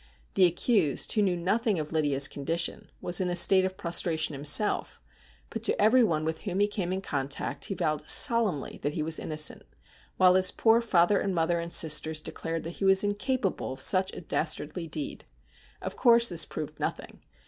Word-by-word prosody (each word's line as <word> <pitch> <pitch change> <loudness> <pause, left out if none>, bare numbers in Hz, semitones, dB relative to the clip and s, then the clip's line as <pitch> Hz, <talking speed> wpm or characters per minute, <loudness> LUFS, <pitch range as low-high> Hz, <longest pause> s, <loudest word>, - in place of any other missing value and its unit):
The 185 - +4
accused, 175 - 0
who 215 - +1
knew 185 -3 0
nothing 205 +4 -1
of 155 -1 -5
Lydia's 145 -3 +1
con 140 - -9
dition, 165 +4 -1
was 175 +1 +1
in 180 - -1
a 175 - -2
state 185 +1 +4
of 190 0 -5
prostration 165 -3 -1
himself, 145 +9 +1 0.5
but 225 - -6
to 225 - +1
everyone 210 -8 +2
with 160 0 -4
whom 190 -2 -4
he 205 - +2
came 195 -4 -4
in 190 +1 -3
contact 140 -3 -4
lie 195 - -3
vowed 155 -4 -3
solemnly 230 - +2
that 145 +1 -3
he 155 - -2
was 160 +1 0
innocent, 155 -1 -1 0.6
while 185 -1 +5
his 185 0 +4
poor 225 +1 +2
father 200 -3 +2
and 195 -2 -3
mother 170 +1 0
and 170 0 -7
sisters 155 -1 +3
declared 165 +1 -6
that 170 +1 -8
he - - -1
was 195 0 +5
incapable 205 - -3
of 135 - -11
such 190 0 +4
a - - -8
dastardly 165 0 -3
deed. 155 -2 -6 0.6
Of - - -6
course, 235 -2 +4
this 170 -2 +1
proved 155 -2 -8
nothing. - - -5
175 Hz, 190 wpm, -27 LUFS, 155-200 Hz, 0.6 s, while